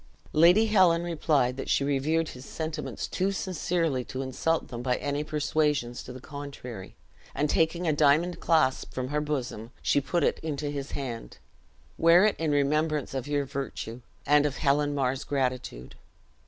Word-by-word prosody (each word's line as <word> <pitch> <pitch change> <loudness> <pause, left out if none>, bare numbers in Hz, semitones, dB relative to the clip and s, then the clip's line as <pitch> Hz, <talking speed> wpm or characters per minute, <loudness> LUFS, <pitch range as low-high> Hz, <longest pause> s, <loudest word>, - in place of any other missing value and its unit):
Lady 175 +8 +6
Helen 185 -6 +4
replied 150 -6 +1
that 135 - -5
she - - +2
revered 150 +4 +1
his 125 - -10
sentiments 155 +1 -4
too 190 +2 0
sincerely 170 -7 -1
to 130 +2 -5
insult 160 +5 -1
them 120 -1 -5
by 125 0 +1
any 145 +2 -2
persuasions 150 -4 0
to - - -9
the 130 - -9
contrary; 140 -7 -8 0.4
and 150 - +1
taking 165 +2 +1
a 155 - +3
diamond 155 +4 +3
clasp 155 -6 +1
from 130 0 -3
her 150 +1 0
bosom, 130 -7 -3
she 145 - +3
put 170 +4 0
it - - +1
into 150 -2 -3
his 140 -1 -5
hand; 120 - -5 0.6
"Wear 170 +4 +6
it 215 - +2
in 160 -1 0
remembrance 150 +1 +1
of 135 0 -3
your 145 -1 0
virtue, 125 -3 -5 0.2
and 150 +1 +4
of 140 - -5
Helen 145 0 +1
Mar's 135 0 0
gratitude." 125 - -3
145 Hz, 165 wpm, -28 LUFS, 130-160 Hz, 0.6 s, Lady